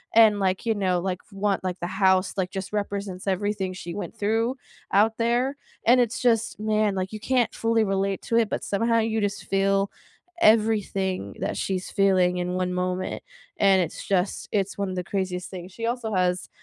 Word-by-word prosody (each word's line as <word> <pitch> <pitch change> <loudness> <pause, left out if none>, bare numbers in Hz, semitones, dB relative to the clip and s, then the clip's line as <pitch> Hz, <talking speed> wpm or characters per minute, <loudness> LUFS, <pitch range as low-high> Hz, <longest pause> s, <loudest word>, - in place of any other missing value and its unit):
and, 215 -3 +6
like, 190 +2 0
you 225 - +2
know, 185 -3 +1
like, 185 0 -2
f - - -28
want 195 -1 0
like, 185 0 -3
the 175 - -3
house, 190 0 +2
like, 185 -1 0
just 190 +1 -5
represents 200 -2 -3
everything 195 0 -1
she 175 -2 -7
went 200 +1 -6
through 225 +5 +1 0.4
out 220 +3 +3
there, 240 +4 +1 0.3
and 245 +2 +6
it's 235 -1 -1
just 225 -4 +1
man, 215 -2 +1
like, 185 +1 -2
you 215 - -5
can't 250 +1 +1
fully 225 -1 +2
relate 195 -1 0
to 230 - 0
it, 225 -3 +3
but - - -3
somehow 230 +3 +1
you 220 -1 0
just 205 -1 -2
feel 195 0 +1 0.5
everything 200 - +2
that - - -1
she's 185 -1 -3
feeling 185 -2 +3
in 180 0 -2
one 180 0 -1
moment, 180 0 -2 0.4
and 195 -2 +5
it's 165 - -4
just 190 0 0
it's 200 -2 -1
one 200 -1 -1
of 185 - -4
the 180 - -2
craziest 180 -1 -3
things. 180 0 -8
She 230 +4 -5
also 235 -2 -2
has 180 -1 0
195 Hz, 195 wpm, -25 LUFS, 185-220 Hz, 0.5 s, and